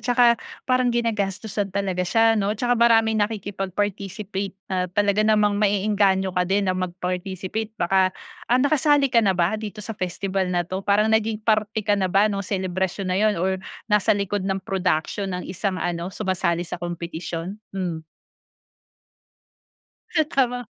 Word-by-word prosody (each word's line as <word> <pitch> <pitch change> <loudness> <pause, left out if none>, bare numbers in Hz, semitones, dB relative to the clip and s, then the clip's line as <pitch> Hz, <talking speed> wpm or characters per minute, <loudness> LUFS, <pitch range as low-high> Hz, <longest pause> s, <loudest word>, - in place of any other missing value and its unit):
saka 240 -1 +5 0.2
parang 255 -1 +2
ginagastusan 210 -3 -1
talaga 195 -2 -2
siya, 225 +5 +3
no, 210 -1 0
tsaka 245 +3 +1
maraming 225 -2 +4
nakikipag-participate 200 -1 -3 0.2
na 180 -1 0
talaga 205 +2 +1
namang 210 -1 +3
maeenganyo 200 -2 +2
ka 180 0 0
din 200 +1 +2
na 185 - +1
mag-participate. 185 +4 -4
Baka 190 -1 +3 0.4
ah, 245 - +4
nakasali 285 0 +3
ka 235 - +6
na 195 -4 +2
ba 180 +5 +1
dito 210 -1 -7
sa 225 - -4
festival 190 -1 -2
na 175 -1 0
'to? 185 +3 -4
Parang 210 +2 +2
naging 220 -1 +1
parte 215 -1 +1
ka 205 - +2
na 195 -2 +1
ba 195 +3 +4
nung 205 -2 0
selebrasyon 190 0 -2
na - - +1
'yun, 215 0 +3
or 190 +2 0 0.2
nasa 210 -1 +3
likod 200 0 -1
ng 195 0 -2
production 185 +1 -1
ng 180 -1 -4
isang 185 +1 -2
ano, 175 -1 -2
sumasali 185 -3 -1
sa 175 - -6
kompetisyon? 175 +2 -5 0.2
Hmm. 175 -4 -2 2.2
Ah, 315 - +5
tama. 250 -4 0
200 Hz, 150 wpm, -23 LUFS, 185-215 Hz, 2.2 s, ka